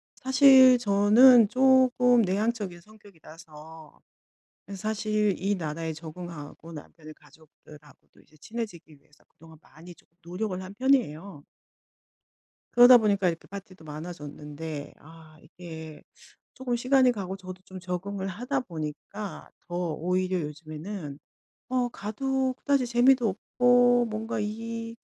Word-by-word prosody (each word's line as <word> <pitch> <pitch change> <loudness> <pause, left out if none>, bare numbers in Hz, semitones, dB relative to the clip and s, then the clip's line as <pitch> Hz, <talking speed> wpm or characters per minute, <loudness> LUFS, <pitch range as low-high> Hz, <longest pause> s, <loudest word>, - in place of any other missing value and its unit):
사실 260 -1 +6
저는 220 +2 +6
쪼금 255 -1 +4
내향적인 200 -1 -2
성격이라서 160 -6 -15 0.8
사실 215 0 -1
이 200 +2 -1
나라에 160 -1 -4
적응하고 165 0 -10
남편의 155 +1 -12
가족들하고도 150 -2 -20
이제 155 - -25
친해지기 175 -6 -8
위해서 150 +1 -28
그동안 160 0 -18
많이 170 +3 -15
좀 - - -26 0.2
노력을 185 +3 -4
한 185 +1 -9
편이에요. 200 - 0 1.3
그러다 245 +1 +8
보니까 200 -4 +1
이렇게 170 -1 -3
파티도 195 -3 -11
많아졌는데 150 -1 -8
아, 160 0 -17
이게 160 -2 -11 0.5
쪼금 250 -2 -3
시간이 255 +1 +3
가고 195 -4 -5
저도 185 -1 -10
좀 190 -2 -11
적응을 190 +2 -5
하다 250 +8 -3
보니까 170 +3 -8 0.2
더 175 - -6 0.2
오히려 185 +2 -1
요즘에는 155 +1 -8 0.5
어 250 -1 0
가도 260 +5 -2
그다지 275 -1 0
재미도 245 0 +3
없고 245 +4 +3
뭔가 220 +1 -4
이 230 +2 -5
195 Hz, 280 characters per minute, -26 LUFS, 160-235 Hz, 1.3 s, 그러다